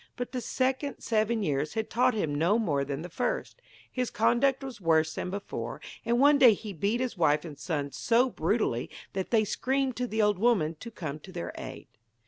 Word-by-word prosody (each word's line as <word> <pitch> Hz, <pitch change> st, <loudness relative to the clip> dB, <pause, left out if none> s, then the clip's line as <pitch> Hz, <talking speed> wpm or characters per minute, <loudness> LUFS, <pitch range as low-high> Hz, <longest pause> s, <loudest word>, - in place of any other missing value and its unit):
But 245 Hz, -, -4 dB
the 255 Hz, -, -3 dB
second 265 Hz, +4 st, -1 dB
seven 220 Hz, 0 st, +1 dB
years 150 Hz, -2 st, -1 dB
had 220 Hz, -1 st, -1 dB
taught 245 Hz, +1 st, +2 dB
him 160 Hz, -9 st, -1 dB
no 170 Hz, +9 st, +3 dB
more 150 Hz, -12 st, +1 dB
than 140 Hz, +2 st, -4 dB
the -, -, -5 dB
first -, -, -3 dB, 0.3 s
his 250 Hz, -2 st, -1 dB
conduct 255 Hz, +5 st, +2 dB
was 260 Hz, -6 st, -7 dB
worse 160 Hz, -2 st, +3 dB
than -, -, -4 dB
before; 200 Hz, +2 st, -5 dB, 0.2 s
and 235 Hz, +1 st, +1 dB
one 285 Hz, +1 st, +6 dB
day 240 Hz, -6 st, +8 dB
he 205 Hz, 0 st, -7 dB
beat 200 Hz, +8 st, 0 dB
his 255 Hz, -2 st, -2 dB
wife 150 Hz, -1 st, +3 dB
and 155 Hz, -3 st, -7 dB
son 145 Hz, -2 st, -3 dB
so 235 Hz, -, +2 dB
brutally -, -, 0 dB, 0.2 s
that 190 Hz, -1 st, -3 dB
they 225 Hz, -2 st, +4 dB
screamed 265 Hz, +4 st, 0 dB
to 250 Hz, 0 st, -1 dB
the 220 Hz, -1 st, -3 dB
old 210 Hz, -3 st, +2 dB
woman 200 Hz, -9 st, +3 dB
to 235 Hz, -, -7 dB
come 155 Hz, -9 st, -6 dB
to 185 Hz, -, -12 dB
their 175 Hz, -2 st, -5 dB
aid. -, -, -8 dB
215 Hz, 205 wpm, -29 LUFS, 160-245 Hz, 0.3 s, day